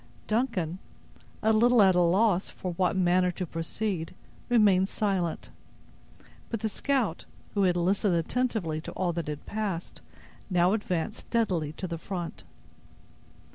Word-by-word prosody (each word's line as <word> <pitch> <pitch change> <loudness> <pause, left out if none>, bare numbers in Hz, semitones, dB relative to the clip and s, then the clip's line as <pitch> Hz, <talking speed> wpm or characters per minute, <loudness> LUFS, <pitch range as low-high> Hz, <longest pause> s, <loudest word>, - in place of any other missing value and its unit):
Duncan, 205 -7 -1 0.6
a 220 +1 +4
little 240 +2 +5
at 190 -2 +7
a 180 - +3
loss 190 +2 +3
in 185 - -1
what 180 +2 +1
manner 180 0 +3
to 180 - -3
proceed, 165 +1 -3 0.3
remained 200 -5 +4
silent; 190 -6 -1 1.0
but 230 -3 -3
the 220 - 0
scout, 235 - -1 0.3
who 200 - +1
had 180 -1 +2
listened 190 +2 +2
attentively 170 -3 -1
to - - -7
all 175 -2 -1
that 150 -3 -4
passed, 205 -5 -4 0.5
now 180 0 +3
advanced 205 -1 -2
steadily 180 -10 -1
to 185 - -6
the 170 -1 -5
front. 170 - -5
185 Hz, 135 wpm, -28 LUFS, 170-215 Hz, 1.0 s, at